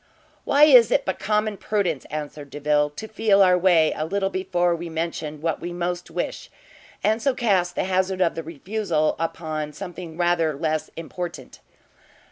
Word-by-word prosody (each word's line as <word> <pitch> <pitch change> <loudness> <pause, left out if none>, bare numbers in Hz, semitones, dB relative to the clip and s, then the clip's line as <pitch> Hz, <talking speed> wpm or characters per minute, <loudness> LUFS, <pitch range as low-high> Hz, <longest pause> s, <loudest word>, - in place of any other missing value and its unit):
"Why 285 +1 +4
it 300 -2 +7
is 235 -3 +7
but 190 - -2
common 210 0 0
prudence," 185 -11 -1
answered 150 -1 -6
Delvile, 150 +1 +1
"to 220 - -6
feel 215 -2 +3
our 180 -1 +5
way 175 -3 +4
a 155 - -2
little 195 +4 -1
before 175 -2 0
we 170 0 -6
mention 160 -2 -4
what 165 -1 -1
we 175 - -4
most 175 0 -3
wish, 175 +2 -4 0.5
and 220 +2 +2
so 275 0 +1
cast 185 -7 +1
the - - 0
hazard 185 0 0
of 175 -3 +2
the 165 - -4
refusal 165 0 -1
upon 155 -2 -3
something 175 -3 -8
rather 175 -3 +1
less 155 +1 -2
important." 170 +1 -7
175 Hz, 165 wpm, -23 LUFS, 160-195 Hz, 0.5 s, it